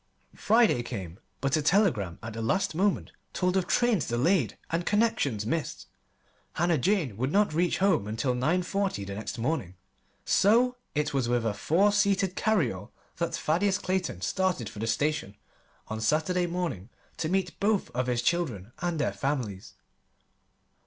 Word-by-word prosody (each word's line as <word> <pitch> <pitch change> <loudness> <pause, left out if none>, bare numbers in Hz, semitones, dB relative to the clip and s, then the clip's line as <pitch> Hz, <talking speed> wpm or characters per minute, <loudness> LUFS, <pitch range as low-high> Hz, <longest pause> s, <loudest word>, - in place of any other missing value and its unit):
Friday 220 - +3
came, 95 -8 -6 0.2
but 135 +1 +1
a 155 - +1
telegram 150 - +2
at 110 0 -6
the 115 - -5
last 190 - 0
moment 195 +4 0 0.2
told 180 0 0
of 185 -2 +1
trains 235 - +2
delayed 125 - +1
and 165 +1 0
connections 205 - +1
missed. 160 +7 -3 0.7
Hannah 170 -3 +1
Jane 160 - 0
would 130 +4 -1
not 205 -3 +2
reach 175 +2 +1
home 190 - +2
until 115 +4 -1
nine 155 +9 +1
forty 195 - -1
the 100 - -6
next 110 +4 -5
morning. 115 - -2 0.5
So 240 +5 +4 0.2
it 150 -1 0
was 130 -4 0
with 120 -1 +1
a 110 - +1
four 175 - +2
seated 200 -2 +2
carryall 150 - 0 0.3
that - - -1
Thaddeus 190 +5 +1
Clayton 185 - -2
started 180 - 0
for - - -10
the 110 - -2
station 145 -3 -1 0.5
on 110 0 -5
Saturday 160 +8 +1
morning 170 - -3 0.3
to 155 - -2
meet 185 -1 -1
both 205 0 +1
of 125 0 -2
his 120 -1 0
children 120 - -1
and 175 -2 -1
their 150 - 0
families. 125 -9 -3
155 Hz, 160 wpm, -28 LUFS, 115-190 Hz, 0.7 s, So